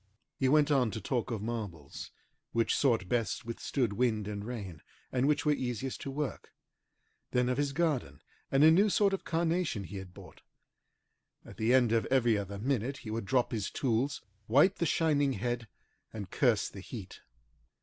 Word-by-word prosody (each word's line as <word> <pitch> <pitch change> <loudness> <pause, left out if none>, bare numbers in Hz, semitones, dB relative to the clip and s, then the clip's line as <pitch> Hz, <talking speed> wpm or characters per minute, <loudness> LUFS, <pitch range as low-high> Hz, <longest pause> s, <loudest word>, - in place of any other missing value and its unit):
He 130 - +3
went 150 +1 +4
on 130 -5 +3
to 110 - -5
talk 120 +3 -2
of 110 -4 -3
marbles, 105 -11 -5 0.4
which 115 -1 +2
sort 115 -9 +2
best 115 +1 -1
withstood 115 0 -1
wind 110 -3 0
and 100 -1 -4
rain, 105 -9 -6 0.3
and 130 +1 +1
which 150 +1 +1
were 150 - +4
easiest 130 -1 -3
to - - -5
work; 135 -3 -4 0.8
then 125 0 +1
of 125 - 0
his 145 -1 +1
garden 140 - -1 0.3
and 135 +2 +4
a 160 - +9
new 200 +6 +5
sort 200 0 +3
of 195 - -2
carnation 165 - 0
he 95 +2 -7
had 95 -1 -8
bought. - - -14 1.0
At - - -12
the 110 +2 +1
end 125 -3 +5
of 115 -1 +2
every 120 -4 +3
other 100 -1 -4
minute 130 +3 -1
he 110 - -4
would 115 -1 -3
drop 125 +2 +1
his 105 -4 -2
tools, 130 +2 -1 0.2
wipe 145 - +5
the 170 - 0
shining 145 -3 +2
head, 120 -2 -3 0.4
and 100 -4 -7
curse 120 -7 +2
the 95 - -9
heat. 100 -2 -9
120 Hz, 180 wpm, -31 LUFS, 110-140 Hz, 1.0 s, a